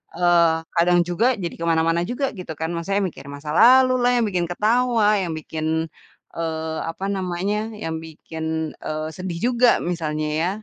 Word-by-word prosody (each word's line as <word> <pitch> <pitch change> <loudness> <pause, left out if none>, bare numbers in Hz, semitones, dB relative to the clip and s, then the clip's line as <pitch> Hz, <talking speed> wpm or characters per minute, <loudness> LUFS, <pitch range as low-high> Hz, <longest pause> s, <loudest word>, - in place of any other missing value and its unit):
eee, 170 -1 +4 0.2
kadang 175 +1 +4
juga 175 +6 0 0.2
jadi 170 - -2
ke 170 - -3
mana-mana 165 +1 +2
juga 270 +3 -1
gitu 180 - -6
kan. 160 0 -2
Maksudnya 195 +4 -1
mikir 150 - -13
masa 145 +1 -9
lalu 255 +2 +7
lah 245 0 +3
yang - - +2
bikin 180 -3 0
ketawa, 230 +3 +2
yang 170 -3 -3
bikin, 155 0 -5 0.7
eee, 160 -1 -3
apa 175 +4 -5
namanya, 190 +2 -2 0.3
yang 160 0 -3
bikin, 160 0 -5
eee, 155 0 -4
sedih 180 -1 -5
juga, 245 0 +4 0.2
misalnya 155 -3 -2
ya, 175 - +1
170 Hz, 165 wpm, -22 LUFS, 160-195 Hz, 0.7 s, lalu